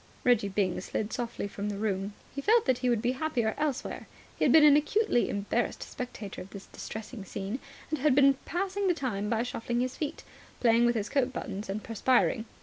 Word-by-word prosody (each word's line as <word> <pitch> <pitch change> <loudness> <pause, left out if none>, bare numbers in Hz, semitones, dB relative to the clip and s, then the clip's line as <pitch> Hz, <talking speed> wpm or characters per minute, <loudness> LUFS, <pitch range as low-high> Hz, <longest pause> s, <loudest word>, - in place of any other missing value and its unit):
Reggie 235 -5 +3
Byng 190 -2 0
slid 210 +3 -3
softly 240 -4 -3
from 200 +1 -4
the 205 - -3
room. 200 -1 -1 0.2
He 280 - -4
felt 450 +8 +4
that 260 -2 +2
he 250 0 +1
would 235 -2 +1
be 245 - +2
happier 255 -5 0
elsewhere. 295 -4 -3 0.3
He - - -2
had - - +5
been 315 -1 +8
an 295 -1 +8
acutely 305 - +2
embarrassed 205 +4 -1
spectator 235 -5 -7
of 185 - -10
this 200 -1 -9
distressing 220 0 -7
scene, 195 +5 -4 0.3
and 310 - -1
had 285 -1 +3
been 275 0 +6
passing 390 +3 -1
the 355 - +3
time 210 -9 -2
by 230 0 +1
shuffling 240 -1 -2
his 255 +1 -1
feet, 305 0 -4 0.4
playing 235 -1 +4
with 240 - +2
his 215 -1 -1
coat 265 -3 +1
buttons 210 -5 -5
and 210 +2 -3
perspiring. 230 0 +2
240 Hz, 205 wpm, -29 LUFS, 210-275 Hz, 0.4 s, been